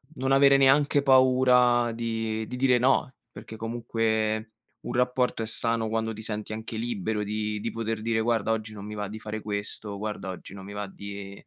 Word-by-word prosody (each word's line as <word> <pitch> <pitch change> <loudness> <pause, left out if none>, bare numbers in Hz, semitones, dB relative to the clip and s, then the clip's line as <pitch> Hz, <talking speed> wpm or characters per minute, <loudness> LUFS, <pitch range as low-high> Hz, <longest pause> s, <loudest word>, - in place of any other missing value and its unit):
non 130 +1 -1
avere 140 0 +6
neanche 140 +1 +4
paura 125 -2 +5
di 115 -1 -3
di 125 - -6
dire 125 -1 +3
no, 130 0 +2 0.2
perché 110 - -10
comunque 110 -1 -1 0.3
un - - -5
rapporto 125 -1 +1
è - - -2
sano 115 0 +1
quando 110 0 -1
ti 110 +1 -8
senti 105 -1 -4
anche 110 +1 -6
libero 110 -2 -2
di 105 0 -2
di 115 - -3
poter 115 -1 -3
dire: 115 0 0
"Guarda, 110 -2 0
oggi 110 -1 -2
non 100 -1 -8
mi 105 0 -6
va 105 -1 -3
di 110 +2 -8
fare 110 0 -5
questo, 100 0 -4
guarda 105 -2 -4
oggi 95 +1 -8
non 95 -1 -9
mi 100 - -9
va 105 0 -4
di 100 0 -8
110 Hz, 195 wpm, -27 LUFS, 105-120 Hz, 0.3 s, avere